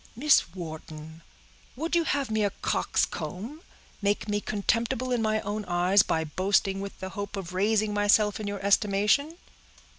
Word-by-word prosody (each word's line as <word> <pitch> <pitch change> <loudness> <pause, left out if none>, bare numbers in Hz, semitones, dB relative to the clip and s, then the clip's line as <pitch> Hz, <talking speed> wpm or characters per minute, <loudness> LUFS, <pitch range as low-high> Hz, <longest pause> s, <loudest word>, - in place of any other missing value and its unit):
"Miss 260 - +3
Wharton, 160 -2 -8 0.5
would 325 +6 -2
you 340 -1 +2
have 280 -6 -1
me 220 -1 +1
a 205 - +2
coxcomb—make 205 - -3
me 205 0 -1
contemptible 230 +5 -1
in 245 -2 +1
my 215 0 +1
own 210 +1 -3
eyes, 180 +3 +4
by 160 -3 0
boasting 195 +4 0
with 200 0 -7
the 190 - -5
hope 200 +1 -6
of 185 -2 -6
raising 210 +2 +1
myself 205 0 +3
in 210 - -4
your 200 -1 -4
estimation?" 210 +10 +2
205 Hz, 150 wpm, -27 LUFS, 190-220 Hz, 0.5 s, eyes